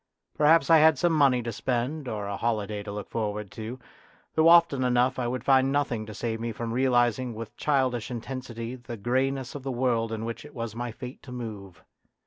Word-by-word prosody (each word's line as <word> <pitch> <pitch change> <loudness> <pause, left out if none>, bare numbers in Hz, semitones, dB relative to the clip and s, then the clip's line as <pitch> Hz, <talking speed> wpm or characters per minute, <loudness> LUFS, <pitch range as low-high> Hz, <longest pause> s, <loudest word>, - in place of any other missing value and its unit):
Perhaps 160 +2 +4
I 165 - +8
had 160 0 +6
some 175 -2 +2
money 135 -5 +4
to 115 - -3
spend 130 +6 -2
or 105 -3 -3
a 100 0 -3
holiday 105 -2 -2
to 100 0 -7
look 105 0 -6
forward 105 -2 -3
to; 115 +3 -6 0.6
though 160 +1 +4
often 165 -6 +6
enough 125 +1 +2
I 120 - 0
would 125 0 -3
find 135 0 +4
nothing 125 -6 -1
to 110 - -8
save 115 -1 -3
me 115 0 -3
from 115 +1 -4
realising 120 -1 +2
with 115 -1 -8
childish 130 -6 0
intensity 120 -1 -5
the 120 -2 -8
grey 130 +6 +1
ness 135 -1 -5
of 145 - -6
the 135 0 -4
world 120 -3 0
in 110 0 -3
which 115 0 -5
it 150 -1 -13
was 115 -2 -5
my 120 0 -4
fate 125 +3 -9
to 130 - -12
move. 105 -7 -7
120 Hz, 210 wpm, -27 LUFS, 115-135 Hz, 0.6 s, I